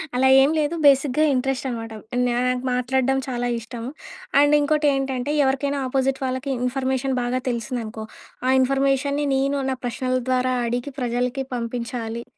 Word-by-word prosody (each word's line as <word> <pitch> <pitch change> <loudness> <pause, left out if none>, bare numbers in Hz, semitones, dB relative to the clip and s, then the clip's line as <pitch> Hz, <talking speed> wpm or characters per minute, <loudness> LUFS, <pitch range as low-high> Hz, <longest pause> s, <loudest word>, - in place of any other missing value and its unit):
అలా 260 +1 +3
ఏం 275 +2 +5
లేదు. 305 +2 0
బేసిక్‌గా 275 +1 +4
ఇంట్రెస్టనమాట. 255 -3 -2 0.4
నాకు 250 +1 0
మాట్లాడడం 260 +2 +1
చాలా 245 -1 -2
ఇష్టం. 230 0 -8 0.6
అండ్ 290 +1 +5
ఇంకోటేంటంటే, 285 -3 +1
ఎవరికైనా 275 +1 0
అపోజిట్ 265 +1 0
వాళ్ళకి 260 +2 -3 0.2
ఇన్ఫర్మేషన్ 265 +1 -1
బాగా 245 +1 -1
తెలిసిందనుకో, 230 -2 -4 0.4
ఆ - - +3
ఇన్ఫర్మేషన్‌ని 275 +2 +1
నేను, 275 +1 +1
నా 265 - 0
ప్రశ్నల 255 +2 -1
ద్వారా 255 0 +1
అడిగి, 245 +4 -2
ప్రజలకి 245 +2 -1
పంపించాలి. 235 -1 -4
260 Hz, 125 wpm, -23 LUFS, 245-270 Hz, 0.6 s, ఏం